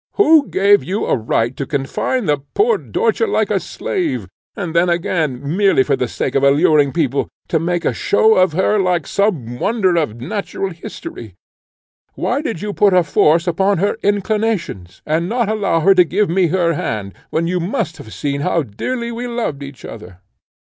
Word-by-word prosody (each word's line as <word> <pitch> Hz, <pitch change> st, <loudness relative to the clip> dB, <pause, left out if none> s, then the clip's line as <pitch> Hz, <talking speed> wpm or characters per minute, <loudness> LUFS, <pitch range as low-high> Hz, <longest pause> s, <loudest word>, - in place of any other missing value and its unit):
Who 320 Hz, -8 st, +5 dB
gave 200 Hz, +2 st, +3 dB
you 195 Hz, +4 st, -2 dB
a -, -, +1 dB
right 115 Hz, +1 st, -1 dB
to 140 Hz, -, -4 dB
confine 150 Hz, -, -2 dB
the 145 Hz, -2 st, +1 dB, 0.2 s
poor 450 Hz, +3 st, +3 dB
Dörtje 455 Hz, 0 st, 0 dB
like -, -, 0 dB
a -, -, +2 dB
slave, 335 Hz, -9 st, -3 dB, 0.3 s
and 180 Hz, -7 st, -4 dB
then 170 Hz, +1 st, +3 dB
again, 165 Hz, -6 st, -1 dB, 0.2 s
merely 195 Hz, -9 st, +4 dB
for 140 Hz, -, +1 dB
the 125 Hz, -, -2 dB
sake 125 Hz, -, -3 dB
of 135 Hz, -, +2 dB
alluring 140 Hz, +1 st, +4 dB
people, 140 Hz, -4 st, 0 dB, 0.2 s
to 160 Hz, -, +1 dB
make 175 Hz, +1 st, -2 dB
a -, -, +1 dB
show 220 Hz, +2 st, +3 dB
of 185 Hz, -5 st, +3 dB
her 190 Hz, +4 st, +2 dB
like 180 Hz, -2 st, +1 dB
some 150 Hz, -, -1 dB
wonder 200 Hz, -5 st, +1 dB
of 120 Hz, -8 st, -1 dB
natural 195 Hz, -, -4 dB
history? 115 Hz, -, -9 dB, 0.8 s
Why 260 Hz, +4 st, -1 dB
did 225 Hz, -, -4 dB
you 210 Hz, -1 st, -3 dB
put 200 Hz, -2 st, +3 dB
a 180 Hz, -, +5 dB
force 165 Hz, +1 st, +3 dB
upon 190 Hz, +3 st, +1 dB
her 200 Hz, +4 st, 0 dB
inclinations, 205 Hz, -, -2 dB
and 165 Hz, +3 st, -1 dB
not 235 Hz, -2 st, 0 dB
allow 200 Hz, -6 st, 0 dB
her 195 Hz, +4 st, +5 dB
to 180 Hz, -1 st, +6 dB
give 190 Hz, +2 st, 0 dB
me 180 Hz, 0 st, +3 dB
her 170 Hz, 0 st, +1 dB
hand, 100 Hz, -9 st, -4 dB, 0.2 s
when 165 Hz, -, -1 dB
you 180 Hz, +2 st, -1 dB
must 175 Hz, -, -2 dB
have 110 Hz, -, -11 dB
seen 140 Hz, +2 st, -3 dB
how 170 Hz, 0 st, +1 dB
dearly 235 Hz, -, -4 dB
we 240 Hz, +1 st, -5 dB
loved 235 Hz, -12 st, -3 dB
each 140 Hz, -2 st, -9 dB
other? 105 Hz, -5 st, -10 dB
175 Hz, 185 wpm, -18 LUFS, 145-205 Hz, 0.8 s, to